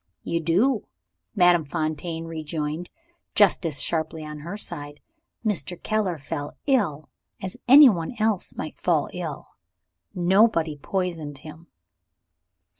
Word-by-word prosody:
"You 170 - -1
do," 200 - +2 0.5
Madame 175 -2 +5
Fontaine 160 +2 -3
rejoined, 160 0 -4 0.5
just 200 -4 +4
as 145 -4 +1
sharply 160 -1 -2
on 150 0 -7
her 170 +7 -6
side. 145 -7 -6 0.5
"Mr. 180 -4 -1
Keller 210 -6 -1
fell 145 0 -6
ill, 180 - +1 0.3
as 190 -1 -5
anyone 245 - +7
else 215 -3 0
might - - -6
fall - - +1
ill. - - -5 0.7
Nobody 180 -3 +3
poisoned 165 -2 -3
him." 160 +3 -12
170 Hz, 115 wpm, -25 LUFS, 155-195 Hz, 0.7 s, anyone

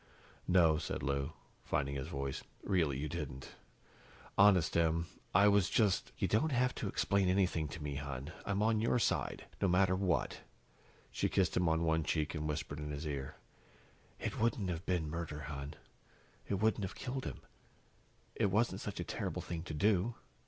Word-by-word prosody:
"No," 85 -4 +5
said - - -4
Lou, 70 0 -1 0.3
finding 70 +1 -1
his 65 -1 -3
voice, 70 -1 -3 0.2
"really 80 -9 +1
you 75 +3 -2
didn't. 70 -5 -5 0.8
Honest, 95 -5 +5
Em, 85 0 +2 0.3
I 100 +3 +6
was 100 -2 +4
just 105 -5 +2
" - - -32
"You - - +1
don't 150 +9 +2
have 125 -1 +2
to 105 - -1
explain 100 -1 +2
anything 90 -4 +2
to 75 +2 -7
me, 70 -2 -3
hon. 70 +1 -5
I'm 100 +1 0
on 110 -1 +3
your 115 +2 +2
side, 120 - 0 0.2
no - - +4
matter 95 +1 +4
what." 95 -2 0 0.7
She - - 0
kissed 95 -2 +2
him 90 -2 +3
on 80 +1 +2
one 80 -1 +2
cheek 75 -1 0
and 75 -1 -2
whispered 75 -1 -3
in 75 0 -4
his 75 +2 -4
ear, 70 -3 -4 0.8
"It - - -3
wouldn't 110 -4 +1
have 85 +2 -5
been 90 -4 +1
murder, 75 -1 -4
hon. 70 0 -6 0.7
It 100 - 0
wouldn't 110 +1 +1
have 95 - -4
killed 130 0 -4
him. - - -5 0.9
It - - +2
wasn't 105 -1 +1
such 100 - -5
a - - -1
terrible - - -3
thing 85 -2 -4
to 80 - -5
do. 105 +5 +2
85 Hz, 180 wpm, -35 LUFS, 75-100 Hz, 0.9 s, I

